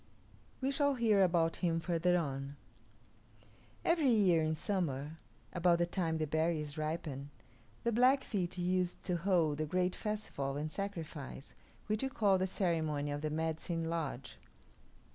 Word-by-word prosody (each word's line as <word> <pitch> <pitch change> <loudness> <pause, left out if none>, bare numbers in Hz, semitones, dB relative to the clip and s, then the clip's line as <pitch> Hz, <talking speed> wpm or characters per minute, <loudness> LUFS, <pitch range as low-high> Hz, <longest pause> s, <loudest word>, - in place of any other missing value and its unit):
We 265 +1 +1
shall 285 0 +2
hear 220 -5 +3
about 170 -3 +3
him 165 -2 +1
further 175 +1 +2
on. 140 -3 -3 1.3
Every 330 -5 +3
year 195 -8 +4
in 155 0 0
summer, 155 -6 -2 0.4
about 175 -1 +3
the 175 - +2
time 170 -2 -1
the 155 - 0
berries 155 -1 0
ripen, 155 -3 -3 0.5
the 235 - +1
Blackfeet 235 -7 +2
used 180 0 0
to 180 -2 0
hold 170 -5 +2
the 155 - -1
great 180 +3 +1
festival 175 -11 -3
and 155 +1 -3
sacrifice 160 -8 -6 0.3
which 215 0 -1
we 270 - 0
call 200 -6 +3
the 185 - +1
ceremony 160 -6 0
of 145 0 -3
the 155 - -1
Medicine 160 +1 -2
Lodge. 150 -6 -4
170 Hz, 145 wpm, -34 LUFS, 155-190 Hz, 1.3 s, year